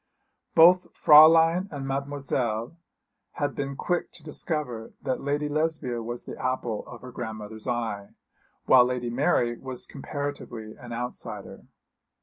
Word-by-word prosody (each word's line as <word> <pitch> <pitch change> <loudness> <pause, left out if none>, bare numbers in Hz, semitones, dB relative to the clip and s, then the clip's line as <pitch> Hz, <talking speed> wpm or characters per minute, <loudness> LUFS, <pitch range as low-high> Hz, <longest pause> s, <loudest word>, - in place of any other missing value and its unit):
Both 180 +3 +6
Fräulein 165 +4 +7
and 140 -2 -5
Mademoiselle 135 -3 -2 0.6
had 145 -1 -2
been 140 -1 -4
quick 175 +5 -2
to 165 - -12
discover 150 -7 -3
that 130 -2 -2
Lady 145 +1 -1
Lesbia 150 -5 -1
was 120 +1 -5
the - - -8
apple 125 -4 -2
of 120 - -10
her 125 - -9
grandmother's 110 -2 -7
eye, 115 -5 -3 0.5
while 125 -2 +7
Lady 125 -1 -2
Mary 120 -3 +1
was 130 -2 -5
comparatively 140 -6 -6
an 120 -1 -11
outsider. 120 +1 -6
130 Hz, 130 wpm, -26 LUFS, 120-150 Hz, 0.6 s, Fräulein